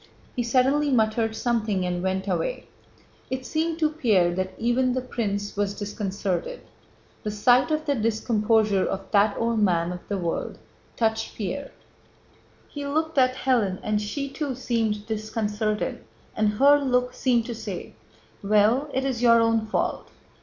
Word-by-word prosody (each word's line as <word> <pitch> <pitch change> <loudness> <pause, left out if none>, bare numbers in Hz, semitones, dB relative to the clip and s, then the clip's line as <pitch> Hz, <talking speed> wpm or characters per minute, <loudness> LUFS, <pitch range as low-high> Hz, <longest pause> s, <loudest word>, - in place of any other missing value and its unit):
He 245 - 0
suddenly 265 +5 +2
muttered 225 -2 +1
something 220 -5 0
and 175 0 -2
went 190 +1 -1
away. - - -2 0.6
It 260 0 -4
seemed 320 +2 -1
to 310 -2 +1
Pierre 210 - +2
that 185 +1 -3
even 245 +2 +1
the 255 - -1
prince 205 -5 -3
was 205 0 -1
disconcerted. 205 - -3 0.6
The 215 - -3
sight 245 +5 +3
of 310 0 -1
the 285 - +1
discomposure 215 -3 +1
of 195 0 -4
that 205 0 +3
old 230 -1 0
man 175 -4 +2
of 180 - -5
the 200 - -2
world 170 -3 -3 0.4
touched 220 -1 -1
Pierre: 230 +7 -4 1.0
he 290 - -7
looked 315 +1 0
at 255 0 +3
Hélène 215 -8 +2
and 210 0 0
she 275 +7 -3
too 275 -1 -4
seemed 225 -4 -1
disconcerted, 215 -1 -2 0.3
and 215 -1 +2
her 280 +6 +5
look 250 -2 +1
seemed 240 -3 +1
to 235 - -4
say: 225 - -6 0.5
"Well, 215 +8 +3
it 265 +1 0
is 255 -3 -2
your 235 -1 +6
own 225 -1 +2
fault." 215 - -2
225 Hz, 155 wpm, -25 LUFS, 205-260 Hz, 1.0 s, your